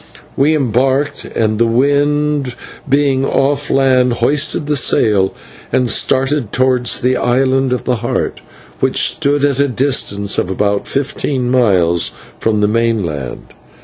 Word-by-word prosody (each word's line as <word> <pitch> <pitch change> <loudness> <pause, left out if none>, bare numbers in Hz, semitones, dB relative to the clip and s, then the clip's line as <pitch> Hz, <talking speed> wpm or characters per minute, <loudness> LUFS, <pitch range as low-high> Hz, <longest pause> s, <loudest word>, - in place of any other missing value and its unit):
We 150 +3 +2
embarked, 135 +1 0
and, 110 -1 -1
the 115 - +3
wind 145 +2 0 0.3
being 140 -1 +2
off 140 +1 0
land, 130 -2 +2
hoisted 145 +5 0
the 150 0 0
sail 105 -6 +2 0.4
and 125 -1 +1
started 135 -3 0
towards 125 -1 +1
the 130 +1 +1
Island 130 +1 +1
of 125 - -1
the 125 -2 -1
Heart, 120 +2 -3 0.4
which - - +2
stood 145 0 +1
at 140 -2 0
a 140 - +3
distance 115 -6 -1
of - - -2
about 100 +1 -1
fifteen 135 -2 -2
miles 90 -9 +2 0.3
from 110 -2 0
the 105 - +3
mainland. 105 - -2
130 Hz, 135 wpm, -15 LUFS, 115-140 Hz, 0.4 s, the